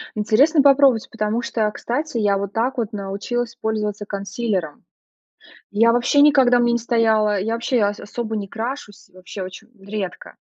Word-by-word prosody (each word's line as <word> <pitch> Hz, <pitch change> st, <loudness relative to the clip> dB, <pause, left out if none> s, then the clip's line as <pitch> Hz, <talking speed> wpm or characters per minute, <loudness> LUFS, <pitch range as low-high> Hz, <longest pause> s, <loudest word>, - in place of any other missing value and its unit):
Интересно 245 Hz, +9 st, +3 dB
попробовать, 275 Hz, -4 st, +4 dB
потому 220 Hz, 0 st, -1 dB
что, 220 Hz, -2 st, -1 dB
кстати, 250 Hz, +5 st, -3 dB
я 205 Hz, -2 st, +2 dB
вот 200 Hz, 0 st, -4 dB
так 240 Hz, +5 st, -1 dB
вот 230 Hz, -3 st, -3 dB
научилась 210 Hz, +4 st, -4 dB
пользоваться 210 Hz, -2 st, -3 dB
консилером. 200 Hz, -4 st, -4 dB, 0.9 s
Я 230 Hz, +3 st, +4 dB
вообще 245 Hz, +4 st, +3 dB
никогда 270 Hz, -4 st, +5 dB
у -, -, +3 dB
мя 240 Hz, 0 st, +2 dB
не -, -, +2 dB
стояла. 220 Hz, -3 st, +1 dB
Я 220 Hz, +4 st, -2 dB
вообще 235 Hz, +2 st, -1 dB
а 205 Hz, -2 st, +3 dB
ас 205 Hz, -, -7 dB
особо 225 Hz, +1 st, -5 dB
не 205 Hz, -2 st, -4 dB
крашусь, 225 Hz, -3 st, -6 dB
вообще 185 Hz, +2 st, -9 dB
оче 185 Hz, +4 st, -10 dB
редко. 195 Hz, -1 st, -6 dB
220 Hz, 165 wpm, -21 LUFS, 205-240 Hz, 0.9 s, никогда